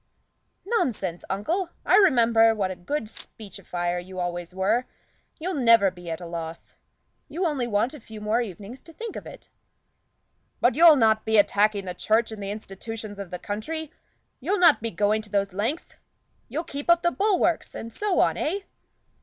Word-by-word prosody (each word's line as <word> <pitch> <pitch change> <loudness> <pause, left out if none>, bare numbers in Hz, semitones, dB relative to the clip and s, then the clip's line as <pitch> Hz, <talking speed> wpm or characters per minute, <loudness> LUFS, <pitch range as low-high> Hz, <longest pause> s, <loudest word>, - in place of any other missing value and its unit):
"Nonsense, 225 - -1
uncle! 330 - -1 0.2
I - - +5
remember 230 - +5
what 195 -3 -1
a - - -5
good 285 +12 -3
speechifier 185 -5 -5
you 185 0 -8
always 175 -1 -3
were; 205 +7 +1 0.5
you'll 365 +4 -3
never 230 - +5
be 175 -1 -10
at 160 - -3
a 175 - -8
loss. 165 -1 -7 0.5
You 335 +6 -2
only 280 -7 0
want 220 +4 0
a 300 - -9
few 220 -2 -11
more 215 +3 +1
evenings 210 +4 -8
to 330 - -15
think 455 +4 -7
of - - -7
it." - - -12 1.1
"But 245 - +3
you'll 325 +2 +8
not 220 -4 +3
be 220 0 +2
attacking 205 0 +3
the 180 - -4
Church 220 +5 +1
and 215 -2 -7
the 200 - -4
institutions 210 +1 -7
of 200 -3 -6
the 180 - -5
country 290 - -5 0.5
you'll 405 - 0
not 340 -8 +5
be 230 - -2
going 210 +3 +1
those 200 -2 -1
lengths; 230 - -3 0.5
you'll 320 - -3
keep 285 -1 -7
up 340 0 +5
the 345 - +3
bulwarks, 385 -4 +1
and 230 0 -7
so 415 -3 0
on, - - +2
eh?" 385 +6 -1
220 Hz, 175 wpm, -25 LUFS, 195-300 Hz, 1.1 s, you'll